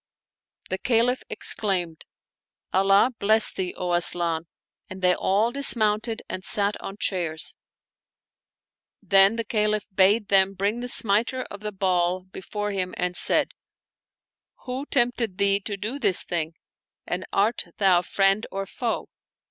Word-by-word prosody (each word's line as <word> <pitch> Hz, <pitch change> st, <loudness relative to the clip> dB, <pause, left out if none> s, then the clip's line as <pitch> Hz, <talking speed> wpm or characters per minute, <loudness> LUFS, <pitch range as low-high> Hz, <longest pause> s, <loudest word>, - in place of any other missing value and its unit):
The 190 Hz, -, -2 dB
Caliph 245 Hz, +1 st, +1 dB
exclaimed, 180 Hz, -6 st, -1 dB, 0.3 s
" -, -, -38 dB
Allah 195 Hz, +5 st, +4 dB
bless 215 Hz, +2 st, +4 dB
thee, 185 Hz, -1 st, -4 dB
O 180 Hz, -1 st, -2 dB
Asian! 170 Hz, -1 st, +3 dB, 0.2 s
" -, -, -49 dB
and 190 Hz, -, -9 dB
they 180 Hz, 0 st, +4 dB
all 205 Hz, +6 st, 0 dB
dismounted 225 Hz, -4 st, 0 dB
and 185 Hz, -, -6 dB
sat 205 Hz, 0 st, 0 dB
on 195 Hz, -, -8 dB
chairs. 170 Hz, -6 st, -2 dB, 1.5 s
Then 195 Hz, +2 st, +5 dB
the 230 Hz, -, -2 dB
Caliph 210 Hz, -1 st, 0 dB
bade 200 Hz, +3 st, +3 dB
them 195 Hz, 0 st, +3 dB
bring 200 Hz, +5 st, -1 dB
the 245 Hz, 0 st, -5 dB
smiter 230 Hz, +4 st, +3 dB
of 205 Hz, -, -8 dB
the 210 Hz, 0 st, -5 dB
ball 185 Hz, -2 st, 0 dB
before 205 Hz, +2 st, -6 dB
him 185 Hz, -2 st, -3 dB
and 180 Hz, 0 st, -2 dB
said, -, -, +4 dB, 0.6 s
" -, -, -69 dB
Who 260 Hz, +3 st, -5 dB
tempted 240 Hz, -6 st, 0 dB
thee 200 Hz, 0 st, +2 dB
to 205 Hz, 0 st, -6 dB
do 220 Hz, +8 st, -4 dB
this 190 Hz, -9 st, +2 dB
thing, 165 Hz, -2 st, -3 dB, 0.5 s
and 180 Hz, +1 st, -3 dB
art 215 Hz, +4 st, 0 dB
thou 185 Hz, -3 st, +3 dB
friend 195 Hz, +4 st, +1 dB
or 195 Hz, 0 st, -4 dB
foe?" 230 Hz, +4 st, -4 dB
200 Hz, 145 wpm, -24 LUFS, 185-220 Hz, 1.5 s, Then